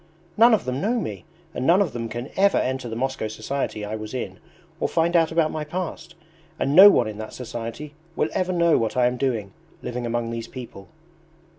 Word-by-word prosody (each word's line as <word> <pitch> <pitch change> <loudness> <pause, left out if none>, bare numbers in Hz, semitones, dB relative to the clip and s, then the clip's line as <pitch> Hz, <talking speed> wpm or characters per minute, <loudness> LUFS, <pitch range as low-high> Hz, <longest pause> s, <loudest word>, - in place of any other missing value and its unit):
None 230 +1 +7
of - - -4
them 130 +2 -2
know 235 +4 +1
me 100 - -5 0.3
and 130 - -2
none 175 +3 +6
of 200 -6 +1
them 115 -1 -4
can 120 +4 -6
ever 200 +1 +4
enter 130 -1 -1
the 110 - -5
Moscow 130 -1 -2
society 110 0 -4
I 105 +1 -4
was 110 +2 -7
in 125 - -5 0.4
or - - 0
find 170 +1 +1
out 165 -1 +4
about 160 -1 +2
my 155 - -3
past. 170 +1 -5 0.4
And 140 +2 0
no 195 +3 +11
one 120 - +3
in 105 0 -7
that 110 - -7
society 120 +4 -6 0.2
will 155 - 0
ever 185 0 0
know 170 -2 +3
what 115 +2 -2
I 125 - +4
am 125 +1 +1
doing, 115 -7 -2 0.3
living 120 0 -4
among 115 0 -2
these 115 -1 -5
people." 115 -7 -10
130 Hz, 210 wpm, -24 LUFS, 115-165 Hz, 0.4 s, no